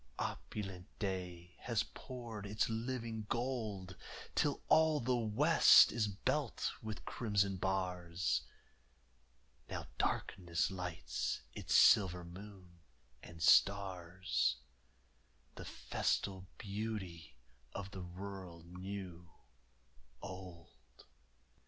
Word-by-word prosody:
Opulent 95 -3 -4
day 90 -3 -4
has 115 -3 0
poured 115 -5 -7
its 105 +1 +1
living 115 -1 -3
gold 110 -7 -2 0.4
Till - - +1
all 160 -1 +5
the 125 0 +1
west 110 -3 +7
is 110 -2 +1
belt 110 +6 -1
with 110 -1 -6
crimson 100 -4 +1
bars, 90 -6 0 1.3
Now - - -4
darkness 85 0 0
lights 90 -3 -3
its - - -1
silver 90 -5 +6
moon 90 -1 -11 0.4
and 80 0 -8
stars, 90 -8 +3 1.0
The - - -8
festal 95 -1 -1
beauty 100 - -5 0.4
of 95 -1 -5
the 95 - -6
world 90 -1 -8
new 90 -1 -7 0.9
old. 85 -9 -11
95 Hz, 90 wpm, -36 LUFS, 90-105 Hz, 1.3 s, west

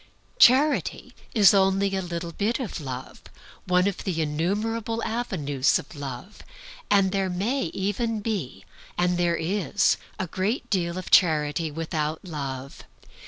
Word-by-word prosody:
Charity 255 - +4 0.2
is 205 -4 +7
only 195 0 +2
a 190 - -1
little 170 -1 -5
bit 215 - -1
of 225 -9 -4
Love, 130 -2 -7 0.5
one 180 +1 +3
of 200 - -3
the 180 -5 -2
innumerable 210 +9 -1
avenues 150 - 0
of 170 -3 -9
Love, 140 - -8 0.5
and 195 -2 +4
there 195 -1 0
may 200 +8 -1
even 205 +6 -2
be, 190 - -4 0.3
and 175 0 +1
there 170 -1 +2
is, 195 +4 +1 0.2
a 190 - -2
great 190 - -2
deal 175 -3 0
of 185 - -6
charity 155 -1 +3
without 155 +1 -3
Love. 140 -5 -6
185 Hz, 135 wpm, -25 LUFS, 160-205 Hz, 0.5 s, is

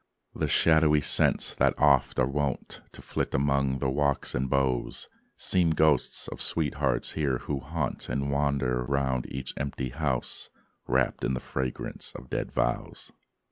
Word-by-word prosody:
The - - -1
shadowy 80 -2 +4
scents, 70 - +2
that - - +2
oft 70 -4 +3
are 65 - +4
wont 70 +1 -2
To - - -11
flit - - -2
among 70 -1 +1
the 65 - -1
walks 70 0 0
and 65 +1 -1
boughs, 65 -2 0 0.3
Seem 90 -3 +2
ghosts 80 -4 +2
of - - -7
sweethearts 80 -4 0
here 70 -5 0
who 70 +2 -3
haunt 70 +1 -3
And 70 0 -1
wander 70 -3 +1
round 65 -1 0
each 65 -1 -4
empty 65 -1 -3
house, 65 -2 -2 0.4
Wrapped 65 -1 +1
in 65 - +1
the - - -2
fragrance 65 -1 -4
of 65 - -10
dead - - -2
vows. - - -2
70 Hz, 150 wpm, -28 LUFS, 65-75 Hz, 0.4 s, shadowy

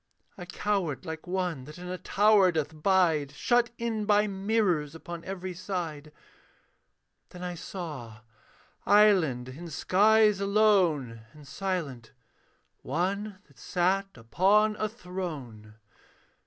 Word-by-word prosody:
I 180 - -9
cowered 180 -5 -2
like 160 0 -7
one 180 -7 -2
that 150 +3 -11
in 180 0 -8
a 180 0 -5
tower 205 -2 +4
doth 155 -1 -3
bide, 165 -6 +2
Shut 240 +9 +2
in 225 -2 -2
by 210 0 +4
mirrors 195 -6 0
upon 170 +1 -8
every 185 -1 -5
side; 170 -5 -5 1.2
Then 180 0 -10
I 180 0 -4
saw, 150 - -8 0.6
islanded 160 -12 +3
in 170 +3 -9
skies 210 +6 +3
alone 190 - +2
And 150 -2 -15
silent, 140 -7 -4 0.7
one 195 +6 -3
that 140 -3 -23
sat 190 +2 0
upon 195 - +2
a 215 - -1
throne. 155 - -7
180 Hz, 115 wpm, -28 LUFS, 150-200 Hz, 1.2 s, tower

